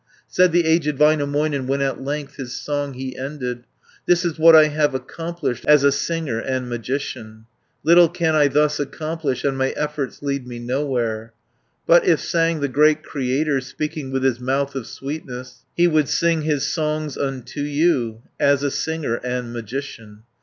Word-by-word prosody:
Said 180 -1 +3
the 170 0 +3
aged 160 -3 +2
Väinämöinen, 145 -2 +2
When 135 +1 0
at 135 -2 -1
length 145 +1 -4
his 130 -3 -6
song 145 -1 -3
he 130 0 -6
ended, 125 -3 -5 0.4
"This 175 0 +3
is 165 -2 -2
what 165 0 +8
I 155 -1 +7
have 150 -2 +1
accomplished 165 0 -4
As 150 -2 +6
a 140 - +5
singer 140 -4 -2
and 130 +1 -2
magician, 115 -3 -5 0.4
Little 170 0 +6
can 170 -2 0
I 150 -2 +5
thus 150 +1 +2
accomplish, 150 -1 -3
And 140 -1 0
my 130 0 +2
efforts 150 -2 -3
lead 140 -3 -2
me 120 -1 -7
nowhere: 120 -3 -2 0.5
But, - - +6
If 380 - +3
sang 165 -2 0
the 140 - +1
great 150 +3 +3
Creator, 140 +1 -1
Speaking 150 +1 -5
with 135 0 -2
his 130 -2 +1
mouth 135 +2 -1
of 135 -4 -5
sweetness, 125 -3 -7
390 175 - +4
He - - +7
would 155 -4 +2
sing 170 -1 +2
his 150 -3 0
songs 155 -2 -2
unto 135 0 -4
you, 145 -7 0 0.2
As 140 0 +3
a 140 - 0
singer 160 -8 -2
and 125 -1 -3
magician. 115 -2 -7
140 Hz, 170 wpm, -21 LUFS, 130-155 Hz, 0.5 s, what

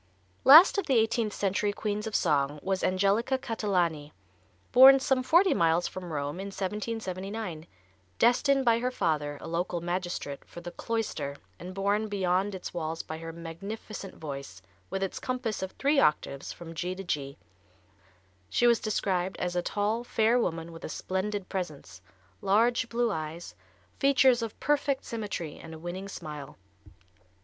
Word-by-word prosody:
Last 320 +9 +9
of 390 - -3
the 270 - +3
eighteenth 225 -1 +1
century 200 +1 0
queens 210 +1 -3
of 220 - -4
song 145 -3 +1
was 190 -1 -1
Angelica 200 +7 +2
Catalani, 175 - -1 0.6
born 270 +2 +9
some 265 -1 +1
forty 345 +8 +4
miles 165 +1 +2
from 180 -2 -7
Rome 145 +2 -3
in 195 - -4
1779, 195 -3 -4 0.5
destined 270 +3 +3
by 230 -1 +4
her 250 +1 0
father, 150 - -1
a - - -7
local 170 +1 -2
magistrate, 175 -5 -3
for - - -11
the 175 0 -7
cloister, 185 -13 -3 0.2
and 185 +1 -8
borne 200 +2 +1
beyond 195 0 0
its 185 - -7
walls 165 -1 -3
by 160 0 -7
her 165 0 -6
magnificent 190 +5 -7
voice, 140 - -7 0.3
with 195 - -2
its 195 - -3
compass 255 -4 -3
of 190 - -3
three 280 +1 +2
octaves, 140 - +1
from 165 -1 -9
G 180 +3 -3
to 195 - -7
G. 140 -6 -3 1.1
She 240 - +2
is 235 -2 +5
described 190 -3 -1
as 180 0 -2
a 175 - +2
tall, 210 +5 -1
fair 230 0 +2
woman 165 -6 -2
with 165 - -11
a - - -5
splendid 190 +3 -3
presence, 155 - -6 0.4
large 235 +5 +2
blue 235 -1 +1
eyes, 160 - -5 0.5
features 265 -3 +4
of 225 -2 -5
perfect 285 -2 0
symmetry 205 -9 -5
and 160 0 -9
a - - -8
winning 175 +4 -6
smile. 150 -7 -8
190 Hz, 155 wpm, -29 LUFS, 165-225 Hz, 1.1 s, Last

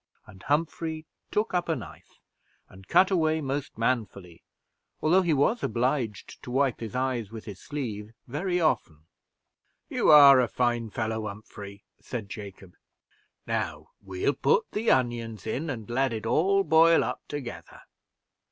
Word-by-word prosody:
And 95 0 -15
Humphrey 160 - -2 0.2
took 210 -1 -1
up 175 -1 0
a 165 - +2
knife, - - -11 0.5
and 95 0 -16
cut 190 - +4
away 160 -3 +2
most 140 -1 -4
manfully, 105 -8 -2 0.6
although 175 +5 +4
he 175 -3 0
was 155 - +2
obliged 120 -2 -2
to - - -10
wipe 135 0 +1
his 115 0 -6
eyes 125 -5 -1
with 110 -1 -9
his 100 -3 -9
sleeve 110 -8 -5
very 175 +7 -2
often. 80 - -1 0.8
"You - - +1
are 140 -3 +9
a 125 - +3
fine 120 0 -1
fellow, 110 0 -3
Humphrey," 100 -1 -10 0.2
said 110 -5 -6
Jacob. 100 -3 -9 0.7
"Now - - -3
we'll 95 +7 -1
put 140 - +1
the 225 +2 -1
onions 120 -4 0
in, 135 +8 -3
and 115 -6 -5
let 130 +1 0
it 110 -1 -5
all 195 +11 +2
boil 165 -1 +5
up - - -4
together. 120 - -7
125 Hz, 145 wpm, -27 LUFS, 110-155 Hz, 0.8 s, are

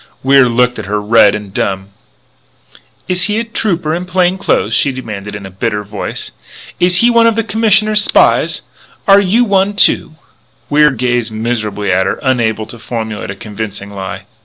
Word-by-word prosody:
Wier 135 -1 +5
looked 125 +1 +1
at - - -7
her, 105 +1 -1
red 105 -1 +4
and 105 -2 -8
dumb. 95 -1 -2 1.2
"Is 180 0 +1
he 210 +1 -1
a - - -1
Trooper 180 -8 -2
in 175 +2 -3
plain 185 +1 +1
clothes?" 115 - 0
she 140 - +2
demanded 105 -6 -7
in 100 -1 -8
a 95 - -9
bitter 105 +2 -2
voice. 105 0 -6 0.5
"Is 180 0 +3
he 240 +1 +4
one 230 -1 +4
of 230 - +2
the 225 - 0
Commissioner's 215 -1 +2
spies? - - +2 0.4
Are 200 0 +7
you 205 +5 +2
one, 200 -2 +1
too?" 160 -5 +2 0.6
Wier 150 +1 +5
gazed 125 -3 -1
miserably 110 -3 -2
at 95 +1 +1
her, - - -2
unable 115 -5 0
to 120 - -11
formulate 110 -3 -5
a 95 - -5
convincing 100 -1 -7
lie. 95 0 -6
120 Hz, 175 wpm, -14 LUFS, -, 1.2 s, Are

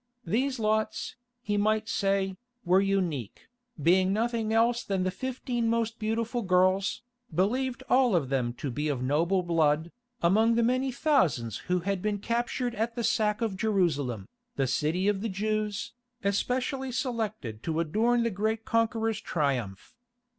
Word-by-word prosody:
These 260 +4 0
lots, 215 -1 -1 0.3
he 205 -2 0
might 215 +1 +1
say, 195 -2 0 0.3
were 185 +2 +5
unique, 180 - -2 0.3
being 185 +5 +4
nothing 225 +1 0
else 235 +2 +3
than 195 -2 -1
the 185 - 0
fifteen 245 +1 -2
most 230 0 -1
beautiful 225 +2 -1
girls, 185 +1 +2 0.3
believed 245 +9 0
all 250 -5 +4
of 145 -7 +1
them 130 -3 0
to 130 +2 -5
be 150 +6 -2
of 135 -4 -1
noble 165 +8 +1
blood, 160 -1 +1 0.3
among 220 +6 +4
the 235 - +3
many 255 +3 +1
thousands 170 - +1
who 180 0 +2
had 195 +1 -2
been 210 0 0
captured 240 +3 -1
at 230 +1 -2
the 240 - -2
sack 210 -1 +1
of 220 -4 -1
Jerusalem, 160 - 0 0.3
the 135 - +1
city 155 +8 0
of 205 -2 +1
the 225 - -2
Jews, 210 +1 -2 0.3
especially 250 +6 -1
selected 215 - -3
to 160 +2 -2
adorn 225 +9 +2
the 230 - 0
great 220 +3 -1
conqueror's 225 -1 0
Triumph. 125 - -2
205 Hz, 150 wpm, -28 LUFS, 170-230 Hz, 0.3 s, were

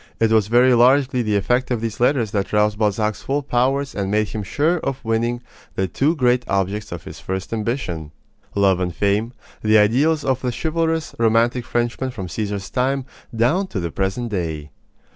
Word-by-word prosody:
It 115 -1 +3
was 110 -2 +3
very 125 +3 +5
largely 130 +1 +4
the 105 -3 0
effect 125 +6 +1
of 120 -3 0
these 115 -1 -4
letters 120 -4 +2
that 100 -2 -2
roused 105 0 +2
Balzac's 105 0 0
full 145 +2 -1
powers 135 +2 0
and 100 -2 -2
made 105 +1 +1
him 110 - -4
sure 155 - 0
of 135 -4 -3
winning 120 +2 0 0.3
the 95 - 0
two 145 - +1
great 125 -3 +2
objects 100 +2 -1
of 85 - -6
his - - -10
first 95 +3 -4
ambition 105 - -3 0.4
love 100 -2 +3
and 90 -2 -2
fame 105 +5 +1 0.3
the 110 0 +4
ideals 140 +9 +3
of 130 -1 0
the 125 - -1
chivalrous, 160 +3 -1
romantic 115 +2 +2
Frenchman 120 +4 -1
from 95 -8 -6
Caesar's 100 0 -4
time 135 +1 0 0.3
down 140 - +2
to 110 - -4
the 85 -2 -3
present 95 +7 -2
day. 80 -6 -3
115 Hz, 180 wpm, -21 LUFS, 100-130 Hz, 0.4 s, very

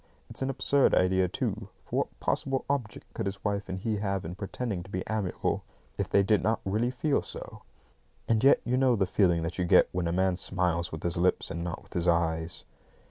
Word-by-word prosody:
It's - - -9
an 135 - 0
absurd 135 +1 +3
idea, 90 0 +3
too; - - -3 0.2
for - - -3
what - - -2
possible 135 -1 -1
object 130 -7 -3
could 110 - -3
his 95 0 -5
wife 100 -1 -1
and 95 - -3
he 105 +3 -1
have 100 -3 -2
in 85 - -5
pretending 100 +1 -4
to 95 - -12
be 95 -1 -3
amiable, 105 -4 -1 0.4
if - - -1
they 100 - +4
did 105 +1 +3
not 110 +1 +1
really 110 +5 +1
feel 140 +3 0
so? - - -8 0.7
And 115 0 +2
yet 135 - +6
you 125 +1 +1
know 130 -2 +4
the 100 -3 +2
feeling 90 -3 +2
that 85 +3 -4
you - - +2
get - - +5
when 85 -1 -1
a - - 0
man 95 0 +1
smiles 85 -2 -1
with 80 - -7
his 85 -1 -1
lips 90 +1 +1
and 85 +1 -3
not 85 0 -5
with 95 - -16
his 85 -1 -1
eyes. 85 -1 0
95 Hz, 220 wpm, -29 LUFS, 85-110 Hz, 0.7 s, yet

